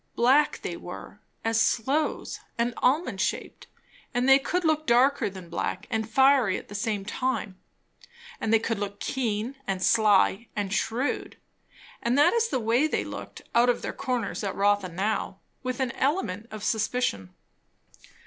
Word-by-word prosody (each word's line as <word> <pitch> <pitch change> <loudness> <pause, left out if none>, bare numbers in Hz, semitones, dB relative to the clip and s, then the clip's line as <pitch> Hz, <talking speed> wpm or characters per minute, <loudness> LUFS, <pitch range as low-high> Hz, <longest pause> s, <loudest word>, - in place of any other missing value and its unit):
Black 265 +5 +3
they - - -3
were, - - -9 0.3
as 225 0 +2
sloes, 275 +7 0 0.2
and 235 +1 0
almond 295 +7 +1
shaped; - - -3 0.5
and 245 +1 +1
they 270 0 +7
could 350 +6 -1
look 310 -1 +1
darker 255 +1 +4
than 185 -2 -10
black, 180 +3 -3
and 220 -1 -1
fiery 265 -4 +4
at - - -10
the - - -9
same 205 -1 -2
time; 220 -4 -2 0.8
and 220 - -1
they 225 - +7
could 225 -1 -2
look 205 0 -4
keen 240 0 -2
and 190 -1 -1
sly 215 0 +4
and 205 -2 -2
shrewd, 235 +6 -1 0.6
and 240 +3 +1
that 290 - +5
is 460 -1 +2
the 260 - -1
way 235 +6 +2
they - - -1
looked - - -8
out 240 +1 +4
of 245 - 0
their - - -3
corners 250 -6 -2
at 195 - -2
Rotha 200 -1 +2
now, 195 +6 -2 0.2
with 255 -1 -3
an 260 -2 0
element 235 - -1
of 215 -1 -8
suspicion. 215 - -1
230 Hz, 160 wpm, -27 LUFS, 205-265 Hz, 0.8 s, they